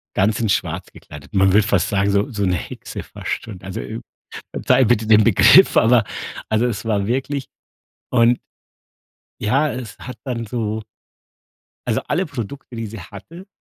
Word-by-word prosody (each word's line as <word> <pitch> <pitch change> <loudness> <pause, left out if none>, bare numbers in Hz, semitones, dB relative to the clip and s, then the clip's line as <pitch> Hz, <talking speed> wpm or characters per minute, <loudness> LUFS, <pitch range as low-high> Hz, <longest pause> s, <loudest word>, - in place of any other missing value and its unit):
ganz 100 +2 +2
in 110 - 0
schwarz - - -1
gekleidet. 70 -2 -13
Man 95 -1 +4
würde 105 0 +4
fast 100 -6 +2
sagen, 100 0 +1
so 100 +5 +1
so 105 -3 -2
'ne 90 -1 +1
Hexe - - -7
fast - - -5
schon. 100 -5 -9
Also, 95 - -6
äh, 110 +1 -6 0.5
verzeihe 130 - +3
bitte 115 -1 +2
den 110 -1 +6
Begriff, 115 - +6
aber 115 0 +5 0.5
also, 110 +2 +2
es 115 -2 -3
war 100 -3 0
wirklich 135 +3 -2 0.6
und 120 0 +4 1.0
ja, 135 +8 +2
es 120 -5 -7
hat 125 - -8
dann 120 -4 -3
so 110 -1 -3 1.1
also - - +1
alle 175 +6 0
Produkte, 140 - -7
die 115 -1 -4
sie 110 0 -8
hatte, 155 - -11
110 Hz, 165 wpm, -20 LUFS, 100-125 Hz, 1.1 s, den